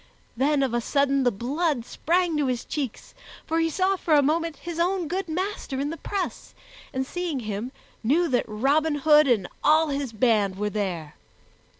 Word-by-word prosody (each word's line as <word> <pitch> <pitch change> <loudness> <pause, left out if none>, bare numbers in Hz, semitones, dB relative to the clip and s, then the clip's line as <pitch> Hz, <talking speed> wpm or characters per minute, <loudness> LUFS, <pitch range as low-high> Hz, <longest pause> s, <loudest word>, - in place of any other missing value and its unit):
Then 275 +3 +2
of 260 -3 -1
a 240 - +1
sudden 275 +2 +2
the 245 -2 +3
blood 270 - -1
sprang 345 +3 0
to 290 -2 +1
his 250 -2 -2
cheeks, 275 -7 -5 0.3
for 325 +1 0
he 325 0 +2
saw 375 +4 +1
for 320 -3 +2
a 290 - +5
moment 325 +2 0
his 340 -1 -6
own 355 0 +1
good 370 +4 -2
master 360 -5 -3
in 285 +2 -1
the - - -4
press 390 +1 -4 0.4
and, 260 0 -2
seeing 335 -3 -3
him, 215 +3 -4 0.3
knew 315 +10 +3
that 250 -2 +1
Robin 285 +8 +1
Hood 300 +1 +5
and 215 -8 +2 0.2
all 310 +1 +4
his 280 -3 -2
band 215 -4 +2
were 210 +1 -1
there. 180 -8 -3
285 Hz, 185 wpm, -25 LUFS, 240-330 Hz, 0.4 s, a